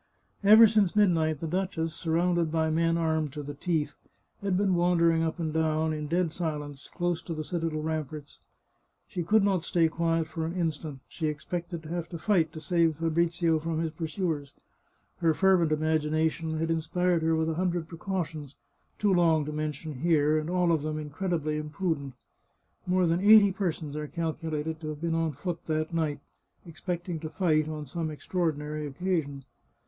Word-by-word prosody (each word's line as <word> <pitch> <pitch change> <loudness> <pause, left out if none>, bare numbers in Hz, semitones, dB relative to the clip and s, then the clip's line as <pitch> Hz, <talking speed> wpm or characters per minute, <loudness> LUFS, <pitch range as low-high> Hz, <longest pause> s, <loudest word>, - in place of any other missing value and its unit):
Ever 215 +3 +9
since 210 -4 +3
midnight 165 -7 +3
the 165 - -2
duchess, 175 -2 -2
surrounded 170 0 +1
by 160 -1 +1
men 165 +1 +2
armed 160 -3 0
to 150 - -5
the 145 +1 -6
teeth, 155 +1 -2 0.4
had 195 -2 0
been 195 -1 +2
wandering 170 -2 +3
up 165 +1 -1
and 160 -2 -2
down, 160 0 +1
in 150 -1 -4
dead 170 0 0
silence, 150 -5 -4
close 175 -1 -1
to 165 - -5
the 155 - -3
citadel 165 -2 -2
ramparts. 155 -2 -4 0.7
She 180 - -4
could 210 +5 +3
not 190 -4 +1
stay 170 -2 +2
quiet 165 0 0
for 160 0 -5
an 165 +2 -3
instant; 155 -5 -3
she 160 - -3
expected 170 +3 -4
to 155 - -9
have 170 -1 -3
to 170 - -5
fight 165 -2 +2
to 155 - -7
save 165 0 +2
Fabrizio 165 +1 +1
from 165 0 -3
his 160 0 -1
pursuers. 160 -3 -3 0.6
Her 165 -2 +2
fervent 185 -4 +4
imagination 155 +1 0
had 165 +1 -1
inspired 170 +2 +1
her 160 0 +2
with 160 0 +1
a - - -1
hundred 175 -1 -1
precautions, 165 -5 -4 0.4
too 205 -2 +2
long 165 -4 +3
to 150 - -4
men 155 0 -1
tion 150 -1 -8
here, 155 -1 +3
and 155 +2 -4
all 180 -1 +2
of 160 -3 +2
them 155 +1 -3
incredibly 155 0 -2
imprudent. 150 -3 -3 0.7
More 185 0 +3
than 170 +1 +2
eighty 205 -1 +8
persons 165 -6 -3
are 150 0 -4
calculated 160 0 -3
to 155 - -5
have 150 0 -6
been 170 -1 0
on 165 -1 0
foot 170 +5 -5
that 155 +1 -1
night, 155 -3 -1 0.4
expecting 175 0 -4
to 155 0 -5
fight 155 -4 +1
on 155 -1 -5
some 160 +4 -3
extraordinary 150 -2 -2
occasion. 145 -3 -2
160 Hz, 175 wpm, -28 LUFS, 155-175 Hz, 0.7 s, Ever